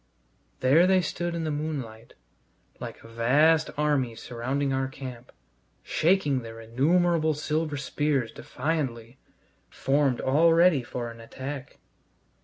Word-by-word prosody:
There 150 Hz, +8 st, +5 dB
they 190 Hz, -1 st, +4 dB
stood 175 Hz, +1 st, -3 dB
in 165 Hz, -, -2 dB
the 155 Hz, -, -1 dB
moonlight, 140 Hz, -7 st, -5 dB, 0.6 s
like -, -, -8 dB
a -, -, -12 dB
vast 145 Hz, +8 st, +3 dB
army 145 Hz, -6 st, +1 dB
surrounding 130 Hz, +5 st, -2 dB
our 135 Hz, 0 st, 0 dB
camp, 130 Hz, -2 st, -9 dB, 0.5 s
shaking 155 Hz, -6 st, +2 dB
their 115 Hz, -1 st, -9 dB
innumerable 155 Hz, +7 st, +2 dB
silver 155 Hz, 0 st, -2 dB
spears 140 Hz, -3 st, -1 dB
defiantly, 130 Hz, -5 st, -4 dB, 0.5 s
formed 135 Hz, -2 st, +1 dB
all 160 Hz, +5 st, +4 dB
ready 165 Hz, -4 st, +5 dB
for 120 Hz, 0 st, -5 dB
an 115 Hz, 0 st, -12 dB
attack. 130 Hz, +4 st, -7 dB
140 Hz, 120 wpm, -27 LUFS, 125-155 Hz, 0.6 s, There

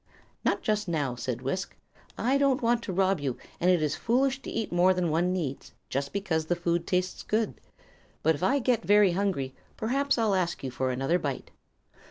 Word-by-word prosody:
"Not -, -, +1 dB
just 210 Hz, -1 st, 0 dB
now," 150 Hz, -7 st, 0 dB
said 125 Hz, 0 st, -4 dB
Wisk. 160 Hz, +9 st, -3 dB, 0.4 s
"I 265 Hz, +4 st, +2 dB
don't 275 Hz, -2 st, +2 dB
want 235 Hz, 0 st, +3 dB
to -, -, -3 dB
rob 190 Hz, -1 st, +2 dB
you, 135 Hz, -4 st, -2 dB, 0.2 s
and 180 Hz, -, +3 dB
it 175 Hz, -4 st, +4 dB
is 150 Hz, -1 st, +1 dB
foolish 265 Hz, +3 st, +1 dB
to -, -, -7 dB
eat 225 Hz, -2 st, -3 dB
more 180 Hz, +2 st, +4 dB
than 175 Hz, -3 st, 0 dB
one 175 Hz, +3 st, +2 dB
needs, 160 Hz, -8 st, -4 dB, 0.2 s
just 140 Hz, +1 st, -2 dB
because 165 Hz, -6 st, -1 dB
the 175 Hz, -, +1 dB
food 170 Hz, 0 st, -1 dB
tastes 180 Hz, 0 st, 0 dB
good. 220 Hz, 0 st, -1 dB, 0.6 s
But 160 Hz, -, +4 dB
if 145 Hz, -, -7 dB
I 255 Hz, +10 st, +3 dB
get 250 Hz, -3 st, +1 dB
very 205 Hz, -2 st, +5 dB
hungry, 175 Hz, -8 st, -1 dB, 0.2 s
perhaps 275 Hz, +5 st, +1 dB
I'll 220 Hz, -3 st, +2 dB
ask 180 Hz, -5 st, -1 dB
you 130 Hz, -, -3 dB
for 130 Hz, +1 st, -1 dB
another 135 Hz, +7 st, +1 dB
bite." 140 Hz, -5 st, -4 dB
180 Hz, 200 wpm, -28 LUFS, 155-215 Hz, 0.6 s, very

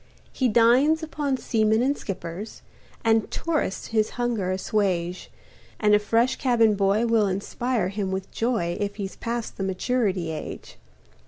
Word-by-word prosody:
He 255 Hz, -2 st, +1 dB
dines 250 Hz, +8 st, +4 dB
upon 290 Hz, -4 st, -2 dB
seamen 220 Hz, -1 st, +2 dB
and 280 Hz, +2 st, +2 dB
skippers, 190 Hz, 0 st, -7 dB, 0.4 s
And 225 Hz, -1 st, +3 dB
tourists 310 Hz, -, -2 dB
his 220 Hz, -1 st, +1 dB
hunger 235 Hz, -6 st, -1 dB
assuage, 185 Hz, -2 st, -1 dB, 0.5 s
And 210 Hz, -1 st, +3 dB
a 210 Hz, -, +6 dB
fresh 230 Hz, +4 st, +1 dB
cabin 230 Hz, -4 st, +3 dB
boy 200 Hz, +3 st, +2 dB
will 225 Hz, -3 st, +3 dB
inspire 200 Hz, +2 st, -1 dB
him 200 Hz, -1 st, -3 dB
with 190 Hz, 0 st, -4 dB
joy 200 Hz, -8 st, -1 dB
If 205 Hz, 0 st, -2 dB
he's 195 Hz, -2 st, -5 dB
past 235 Hz, -1 st, -4 dB
the 195 Hz, -, -3 dB
maturity 190 Hz, -3 st, 0 dB
age. 155 Hz, -, -7 dB
215 Hz, 145 wpm, -25 LUFS, 195-240 Hz, 0.5 s, a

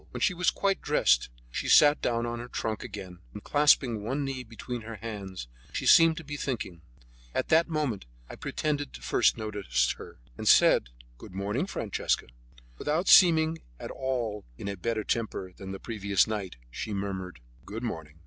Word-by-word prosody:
When -, -, -7 dB
she -, -, +3 dB
was 180 Hz, -1 st, +2 dB
quite 195 Hz, -1 st, 0 dB
dressed, 105 Hz, -, +3 dB, 0.2 s
she -, -, -3 dB
sat 145 Hz, 0 st, +6 dB
down 115 Hz, -1 st, 0 dB
on 120 Hz, 0 st, -3 dB
her 120 Hz, -, -7 dB
trunk 110 Hz, -3 st, -3 dB
again, 95 Hz, -5 st, -8 dB, 0.2 s
and 105 Hz, -, -8 dB
clasping 140 Hz, -6 st, +3 dB
one 135 Hz, +6 st, -2 dB
knee 135 Hz, -1 st, -4 dB
between 120 Hz, +1 st, -7 dB
her 115 Hz, +1 st, -7 dB
hands, 100 Hz, -, -7 dB, 0.3 s
she -, -, -3 dB
seemed 165 Hz, -1 st, +7 dB
to 170 Hz, -, -6 dB
be 145 Hz, 0 st, -6 dB
thinking. 110 Hz, -12 st, -4 dB, 0.5 s
At -, -, -1 dB
that 165 Hz, +2 st, +4 dB
moment 145 Hz, -, -2 dB, 0.2 s
I -, -, -9 dB
pretended 145 Hz, -2 st, -2 dB
to -, -, -10 dB
first -, -, +3 dB
notice 100 Hz, -, 0 dB
her, -, -, -11 dB, 0.2 s
and -, -, -4 dB
said: -, -, +6 dB, 0.3 s
"Good 90 Hz, -, -11 dB
morning, 105 Hz, -, -1 dB
Francesca." 110 Hz, -, -1 dB, 0.5 s
Without 160 Hz, +5 st, 0 dB
seeming 160 Hz, -3 st, +6 dB
in -, -, -24 dB, 0.2 s
at -, -, -6 dB
all 120 Hz, -6 st, -3 dB
a 100 Hz, 0 st, -4 dB
better 110 Hz, +1 st, -2 dB
temper 100 Hz, -5 st, -3 dB
than 95 Hz, 0 st, -8 dB
the 95 Hz, -, -6 dB
previous 100 Hz, -4 st, +1 dB
night, 105 Hz, -4 st, -4 dB, 0.2 s
she 105 Hz, -, -4 dB
murmured, 95 Hz, -5 st, -4 dB, 0.2 s
"Good 110 Hz, +4 st, -7 dB
morning!" 80 Hz, -9 st, -5 dB
115 Hz, 175 wpm, -28 LUFS, 100-145 Hz, 0.5 s, seemed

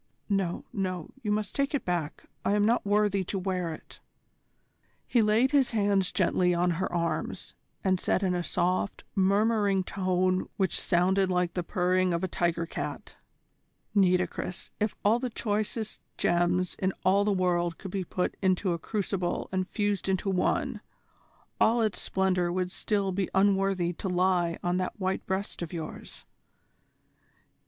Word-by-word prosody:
No, 195 Hz, -4 st, 0 dB
no, 185 Hz, -4 st, -3 dB
you 210 Hz, -, -1 dB
must 210 Hz, -1 st, -1 dB
take 280 Hz, +1 st, 0 dB
it 285 Hz, -, -2 dB
back. 170 Hz, -4 st, -2 dB, 0.2 s
I 200 Hz, -, +2 dB
am 205 Hz, 0 st, +3 dB
not 235 Hz, +3 st, +2 dB
worthy 205 Hz, -1 st, +2 dB
to 195 Hz, -, -3 dB
wear 180 Hz, -3 st, -1 dB
it." 155 Hz, -, -11 dB, 1.1 s
He 240 Hz, -, +3 dB
laid 220 Hz, +5 st, +3 dB
his 280 Hz, -3 st, +4 dB
hands 200 Hz, -4 st, +2 dB
gently 180 Hz, -1 st, +2 dB
on 175 Hz, +1 st, +2 dB
her 185 Hz, +3 st, -2 dB
arms, 170 Hz, -1 st, -2 dB, 0.3 s
and 185 Hz, -2 st, +2 dB
said 185 Hz, -, +1 dB
in 185 Hz, -1 st, +2 dB
a 175 Hz, -, 0 dB
soft, 180 Hz, +3 st, -1 dB
murmuring 200 Hz, 0 st, +2 dB
tone 185 Hz, -1 st, 0 dB
which 190 Hz, -2 st, +1 dB
sounded 185 Hz, +2 st, +2 dB
like 180 Hz, -1 st, +1 dB
the 180 Hz, -, -1 dB
purring 180 Hz, +1 st, +1 dB
of 170 Hz, -, -2 dB
a -, -, +1 dB
tiger 170 Hz, -1 st, 0 dB
cat: -, -, -6 dB, 0.8 s
"Nitocris, 180 Hz, -2 st, +1 dB
if 210 Hz, 0 st, 0 dB
all 220 Hz, +3 st, +4 dB
the 255 Hz, 0 st, -2 dB
choicest 215 Hz, 0 st, -2 dB, 0.2 s
gems 175 Hz, +1 st, +1 dB
in 190 Hz, 0 st, 0 dB
all 195 Hz, +2 st, +4 dB
the 210 Hz, -, +1 dB
world 175 Hz, -3 st, +1 dB
could 190 Hz, -, -8 dB
be 195 Hz, -1 st, -2 dB
put 180 Hz, +1 st, -2 dB
into 185 Hz, -1 st, +2 dB
a 170 Hz, -, -3 dB
crucible 195 Hz, -2 st, -2 dB
and 185 Hz, -1 st, -1 dB
fused 205 Hz, -2 st, -1 dB
into 190 Hz, +1 st, 0 dB
one, 185 Hz, -1 st, 0 dB, 0.8 s
all 230 Hz, +2 st, +4 dB
its 215 Hz, -, -1 dB
splendour 185 Hz, -2 st, +1 dB
would 180 Hz, 0 st, -1 dB
still 200 Hz, -1 st, 0 dB
be 190 Hz, 0 st, -1 dB
unworthy 195 Hz, -2 st, +2 dB
to 190 Hz, -, -4 dB
lie 180 Hz, -2 st, +2 dB
on 175 Hz, +1 st, +1 dB
that 185 Hz, +2 st, -3 dB
white 190 Hz, 0 st, -1 dB
breast 190 Hz, 0 st, -3 dB
of 170 Hz, -, -4 dB
yours. 165 Hz, -3 st, -7 dB
185 Hz, 160 wpm, -28 LUFS, 180-200 Hz, 1.1 s, his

